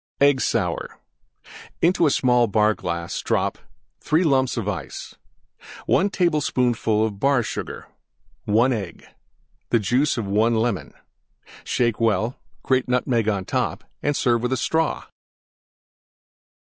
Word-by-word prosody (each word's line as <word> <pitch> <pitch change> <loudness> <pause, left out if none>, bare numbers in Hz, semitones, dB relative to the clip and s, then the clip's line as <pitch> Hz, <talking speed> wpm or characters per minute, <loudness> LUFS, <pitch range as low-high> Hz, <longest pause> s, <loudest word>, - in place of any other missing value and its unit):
EGG 140 -2 +4
SOUR - - -1 0.8
Into 170 -2 +3
small 125 -3 +3
Bar 105 +1 +3
glass 85 -3 -4
drop: - - -1 0.4
3 160 +4 +1
lumps 130 -5 +2
Ice. 100 - -5 0.7
1 200 - +2
tablespoonful 125 - +1
Bar 130 +5 +1
Sugar. - - -6 0.6
1 115 +5 +3
Egg. 100 -6 -6 0.7
Juice 125 +6 +2
of 115 - -2
1 110 +4 +2
Lemon. 110 -3 -1 0.7
Shake 120 -2 0
well; 110 +2 +1 0.2
grate 130 -1 +1
Nutmeg 125 -3 +1
on 100 -3 -1
top - - -2 0.2
and 145 0 0
serve 120 -2 +2
with 125 +2 0
Straw. 160 +6 0
120 Hz, 105 wpm, -23 LUFS, 110-135 Hz, 0.8 s, EGG